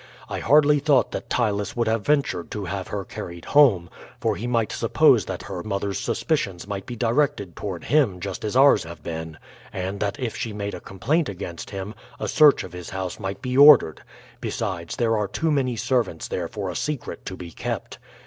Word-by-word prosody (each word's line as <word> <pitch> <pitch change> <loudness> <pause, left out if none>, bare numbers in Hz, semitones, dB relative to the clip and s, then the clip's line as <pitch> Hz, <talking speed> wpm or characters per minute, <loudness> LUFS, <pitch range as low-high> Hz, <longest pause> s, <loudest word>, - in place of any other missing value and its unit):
I - - -4
hardly 150 0 +5
thought 145 -2 +3
that - - -6
Ptylus 105 -4 0
would 120 -1 0
have 110 -1 +1
ventured 140 - 0
to 105 -4 -5
have 95 +2 -4
her 100 -2 -4
carried 85 -1 -8
home, 120 -13 +5 0.3
for - - 0
he 120 - -4
might 115 -3 0
suppose - - +4
that - - -5
her 95 -3 -5
mother's 100 0 -2
suspicions 100 - -1
might 100 -2 -5
be 120 - -5
directed 115 - 0
toward 95 -5 -5
him 130 -12 +2
just 95 0 -5
as 105 +2 -3
ours 135 +2 +6
have 85 -2 -10
been, 80 -1 -6 0.3
and 95 +1 -4
that 100 +7 -2
if 125 -4 -3
she 115 - -4
made 100 0 -4
a - - -7
complaint 140 - -1
against 90 -3 -7
him 100 +1 -6 0.3
a - - -2
search 150 -2 +5
of 90 - -10
his 90 -1 -7
house 95 -2 -4
might 95 +3 -5
be 125 -1 -2
ordered; 140 - +7 0.4
besides, 85 -1 -3
there 115 -2 +1
are 105 -1 0
too 160 +10 -1
many 130 -4 +1
servants 115 -8 -1
there 85 -2 -3
for 100 -1 -4
a - - -8
secret 150 -5 -4
to 95 - -5
be 85 -1 -8
kept. - - -5
105 Hz, 200 wpm, -24 LUFS, 95-125 Hz, 0.4 s, ordered